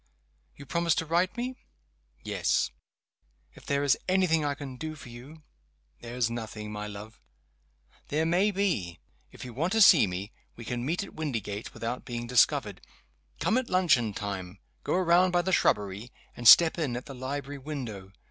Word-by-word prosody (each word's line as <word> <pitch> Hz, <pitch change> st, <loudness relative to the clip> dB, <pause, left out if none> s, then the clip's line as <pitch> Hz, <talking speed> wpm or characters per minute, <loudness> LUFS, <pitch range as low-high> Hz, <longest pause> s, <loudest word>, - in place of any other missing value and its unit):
"You 140 Hz, -, -12 dB
promise 170 Hz, +1 st, +1 dB
to 165 Hz, -, -1 dB
write 175 Hz, +4 st, +1 dB
to -, -, -20 dB
me?" 250 Hz, +1 st, -4 dB, 0.7 s
"Yes." -, -, 0 dB, 0.8 s
"If -, -, -17 dB
there 140 Hz, -1 st, +1 dB
is 140 Hz, -3 st, +3 dB
any 185 Hz, 0 st, +3 dB
thing 165 Hz, -3 st, +2 dB
I 145 Hz, -1 st, -1 dB
can 135 Hz, -2 st, -8 dB
do 155 Hz, +4 st, -6 dB
for 140 Hz, -4 st, -12 dB
you 135 Hz, +7 st, -12 dB, 0.3 s
?" 75 Hz, 0 st, -41 dB
"There 120 Hz, 0 st, -8 dB
is 125 Hz, -2 st, +1 dB
nothing, 110 Hz, -2 st, -6 dB
my 105 Hz, 0 st, -5 dB
love." 105 Hz, +2 st, -10 dB, 0.9 s
"There 155 Hz, +2 st, 0 dB
may 180 Hz, +5 st, +3 dB
be. 180 Hz, -, -1 dB, 0.3 s
If -, -, -10 dB
you 125 Hz, -, -8 dB
want 165 Hz, -, -1 dB
to 225 Hz, -, +2 dB
see 170 Hz, -, +8 dB
me, 95 Hz, +3 st, -5 dB, 0.2 s
we 115 Hz, -, -10 dB
can 120 Hz, +2 st, -3 dB
meet 175 Hz, +5 st, -1 dB
at -, -, -11 dB
Windygates 115 Hz, -9 st, -4 dB
without 115 Hz, +2 st, -4 dB
being 120 Hz, -1 st, -5 dB
discovered. 125 Hz, 0 st, +2 dB, 0.6 s
Come 235 Hz, -, +2 dB
at 260 Hz, -, -6 dB
luncheon 160 Hz, -, +3 dB
time 95 Hz, -2 st, -5 dB, 0.3 s
go -, -, 0 dB
around 180 Hz, 0 st, +4 dB
by 175 Hz, -1 st, +1 dB
the 190 Hz, -, -1 dB
shrubbery 105 Hz, -, +1 dB, 0.2 s
and 120 Hz, -, -1 dB
step 170 Hz, +7 st, +8 dB
in 135 Hz, -7 st, -1 dB
at 125 Hz, -, -7 dB
the 140 Hz, -, -9 dB
library 140 Hz, +2 st, -5 dB
window. 120 Hz, -10 st, -7 dB
135 Hz, 185 wpm, -28 LUFS, 110-170 Hz, 0.9 s, see